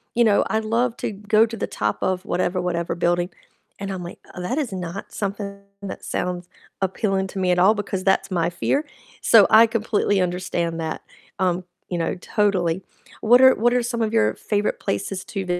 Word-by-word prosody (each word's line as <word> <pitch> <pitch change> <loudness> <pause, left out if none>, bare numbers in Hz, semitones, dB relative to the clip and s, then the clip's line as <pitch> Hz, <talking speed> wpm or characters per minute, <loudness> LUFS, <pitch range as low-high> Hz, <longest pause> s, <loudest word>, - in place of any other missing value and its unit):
you 240 - +4
know, 210 -3 +4
I'd 220 0 0
love 230 +2 0
to - - -3
go 215 +2 +3
to 230 0 -7
the - - -2
top 105 -1 -1
of 185 0 -1
whatever 180 +1 0
whatever 170 -1 -2
building," 175 +1 +1 0.5
and 200 0 -4
I'm 185 -2 -5
like, 175 - -9 0.2
"That 180 +11 -2
is 265 -10 -2
not 180 +1 -6
something 200 -1 -4 0.2
that 195 - -6
sounds 180 0 -3 0.3
appealing 190 0 0
to 195 - -5
me 180 -1 +2
at 180 - +2
all," 205 +4 +5
because 195 -2 -3
that's 195 0 +2
my 175 -2 +1
fear, 280 - -1 0.4
so 220 -4 +7
I 225 +1 +8
completely 215 -3 0
understand 175 -2 -2
that, 160 -1 -3 0.4
um, 180 -1 +1 0.3
you 175 - -2
know, 165 - -1
totally. 185 -3 0 0.4
What 245 +3 +6
are 260 0 +8
what 240 +3 +2
are 250 -1 +2
some 235 -1 -2
of 220 0 0
your 225 - +3
favorite 205 -1 -1
places 185 - -3
to 195 -2 -4
195 Hz, 190 wpm, -23 LUFS, 180-220 Hz, 0.5 s, I